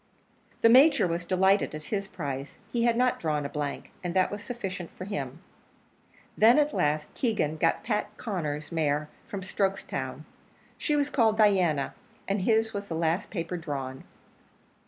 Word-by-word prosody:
The 230 - +7
Major 275 +1 +7
was 170 0 -2
delighted 190 0 +2
at 155 - -7
his 200 +3 -3
prize; 140 -6 -5 0.2
he 235 -1 +2
had 235 -1 +3
not 250 0 +2
drawn 150 -3 -1
a - - -3
blank, 145 -1 -4
and 175 0 -3
that 185 -1 +3
was 205 0 -5
sufficient 195 -8 -5
for 185 - -6
him. 145 -6 -5 0.9
Then, 230 +5 +6
at 300 0 +3
last, 150 +1 0
Keegan 210 - 0
got 165 +1 +1
Pat 210 -2 -2
Conner's 155 - -3
mare 150 -2 0 0.2
from 195 -2 -5
Strokestown. 185 -9 -2 0.6
She 300 - +1
was 290 0 +1
called 225 -5 +3
Diana, 185 -9 +3 0.3
and 200 0 0
his 220 +2 +2
was 200 0 -4
the 165 - -4
last 165 +3 0
paper 175 -2 -3
drawn. 135 -5 -5
185 Hz, 160 wpm, -28 LUFS, 150-215 Hz, 0.9 s, The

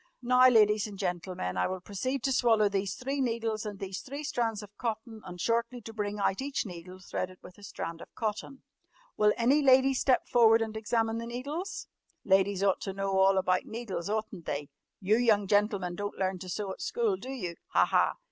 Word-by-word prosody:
"Now, 250 +1 +6
ladies 215 -3 +4
and 205 -2 -9
gentlemen, 175 - -3
I 90 - +2
will 185 0 -4
proceed 230 +8 -3
to 270 - +1
swallow 225 -4 +4
these 195 -1 -1
three 275 +2 -3
needles 230 -3 -1
and 205 -1 -6
these 195 -1 -5
three 280 +3 -7
strands 230 -7 -1
of 205 0 -14
cotton 225 -1 -4
and 180 -1 -9
shortly 235 +4 0
to 225 0 -9
bring 210 -1 -3
out 195 +2 0
each 275 -1 -2
needle 180 -1 -9
threaded 185 0 -5
with 180 +2 -13
a - - -15
strand 165 -4 -6
of - - -12
cotton. 220 +5 -4 0.5
Will 210 0 +4
any 260 +6 +3
lady 265 0 +5
step 260 0 +2
forward 225 -1 +5
and 220 -1 -6
examine 225 +1 0
the 230 - -5
needles? 285 +10 -5 0.4
Ladies 195 0 +3
ought 195 -2 +2
to 195 - -4
know 195 0 0
all 190 0 +5
about 185 -1 +1
needles, 220 -6 -5
oughtn't 215 -5 -3
they? 145 0 -3 0.3
You 210 +3 +2
young 220 -4 +3
gentlemen 205 -3 +1
don't 205 +3 -5
learn 190 -1 -1
to 185 0 -8
sew 200 +1 -3
at - - -8
school, 455 -5 0
do 260 - -9
you? 185 -11 -5 0.2
Ha! - - +5
Ha! - - +2
210 Hz, 205 wpm, -29 LUFS, 190-235 Hz, 0.5 s, Now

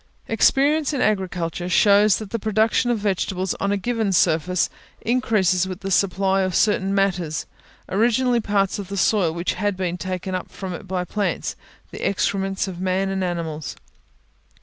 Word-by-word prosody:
Experience 285 +7 +3
in 280 - -1
agriculture 180 -4 -1
shows 205 +1 +5
that 215 -3 -8
the 230 - -2
production 220 +3 +1
of 240 - +2
vegetables 190 -2 -1
on 200 - 0
a 205 - +1
given 220 0 -1
surface 175 0 +2 0.3
increases 210 -7 +1
with 185 0 -6
the 195 - -4
supply 195 0 +2
of 185 -2 -1
certain 195 -2 +2
matters, 180 -5 0 0.4
originally 240 +4 +2
parts 200 -2 0
of 200 - -6
the 200 +1 -5
soil 190 -3 +2
which 170 +2 -2
had 205 -2 -1
been 180 -1 -2
taken 185 +1 -4
up 185 - -4
from 190 -2 -6
it 190 +3 -8
by 180 -1 -2
plants 205 +3 -2 0.4
the - - -8
excrements 195 0 0
of 180 -2 -6
man 190 +1 0
and 190 -1 -1
animals. 160 -6 -4
195 Hz, 165 wpm, -22 LUFS, 180-210 Hz, 0.4 s, shows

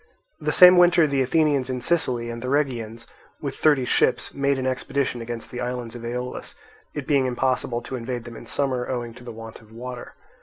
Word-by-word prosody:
The - - -1
same 180 -1 +9
winter 175 -2 +6
the 140 -2 +1
Athenians 140 -1 +2
in 130 -1 -2
Sicily 125 -5 0
and 115 0 -7
the 125 - -4
Rhegians, 120 -5 -1 0.3
with 140 -2 -4
thirty 145 -5 +3
ships, - - +1
made 140 0 +1
an 130 - -3
expedition 130 -1 -1
against 115 0 -6
the 125 - -5
islands 125 -2 -4
of 120 -1 -9
Aeolus; 125 +1 -5 0.4
it 145 -3 -4
being 140 -3 +2
impossible 125 -1 -1
to 130 - -6
invade 120 0 -4
them 120 -1 -10
in 115 - -11
summer, 130 -1 -1
owing 120 -2 -3
to 125 - -14
the 120 - -7
want 115 0 -10
of 110 -1 -20
water. 125 +2 -8
125 Hz, 200 wpm, -24 LUFS, 120-140 Hz, 0.4 s, same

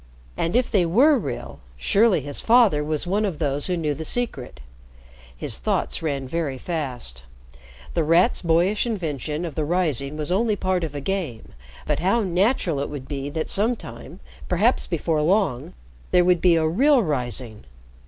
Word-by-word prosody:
And 165 +5 -1
if 250 0 +2
they 195 -5 +3
were 250 - +5
real, - - -6 0.2
surely 200 - +3
his 145 +1 -4
father 225 -11 +4
was 155 +1 -2
one 200 +4 0
of 190 -7 -2
those 145 -1 -1
who 180 -1 -1
knew 155 -3 -1
the 160 - -6
secret. 150 - -2 0.8
His - - -4
thoughts - - -1
ran 140 -4 -2
very 145 -2 -2
fast. 125 - -5 0.7
The 165 - +1
Rat's 170 +9 +3
boyish 175 +7 +2
invention 160 - -3
of 165 - -5
the 155 - -2
rising 150 -4 -1
was 155 +2 -1
only 215 +3 +2
part 185 -2 -1
of 150 -3 -4
a 145 - -4
game, 170 - -4 0.3
but - - 0
how 195 +7 +2
natural 185 - +1
it 140 - -3
would 140 -3 -7
be 140 -1 -4
that 155 +2 -3
sometime 195 - -3 0.3
perhaps 205 +8 +2
before 160 -2 0
long 175 - +1 0.4
there 180 0 +4
would 180 -2 +3
be 175 -2 +5
a 160 -1 +2
real 255 - +4
rising! 125 - -3
165 Hz, 170 wpm, -23 LUFS, 145-195 Hz, 0.8 s, were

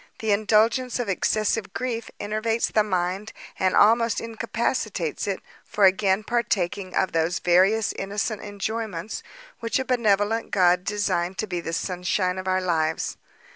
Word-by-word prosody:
The 220 -1 -1
indulgence 220 +4 +2
of 245 -4 -2
excessive 210 +1 0
grief 230 -1 -3
enervates 215 +2 -1
the 215 - +4
mind, 190 +1 -2 0.3
and 185 -1 +2
almost 230 +2 +4
incapacitates 225 - -2
it 195 -2 -2 0.2
for 205 - +2
again 190 +1 +3
partaking 200 -5 -1
of 190 - +1
those 165 +2 +1
various 190 +5 +3
innocent 200 +2 -3
enjoyments 210 -2 -4 0.4
which 230 0 -1
a 265 - -2
benevolent 225 -3 +1
God 180 -2 +3
designed 190 -3 -1
to - - -1
be 180 -4 -3
the 165 - -5
sunshine 180 +1 -1
of 185 - -6
our 185 0 +2
lives. 160 -3 -1
205 Hz, 140 wpm, -24 LUFS, 185-225 Hz, 0.4 s, the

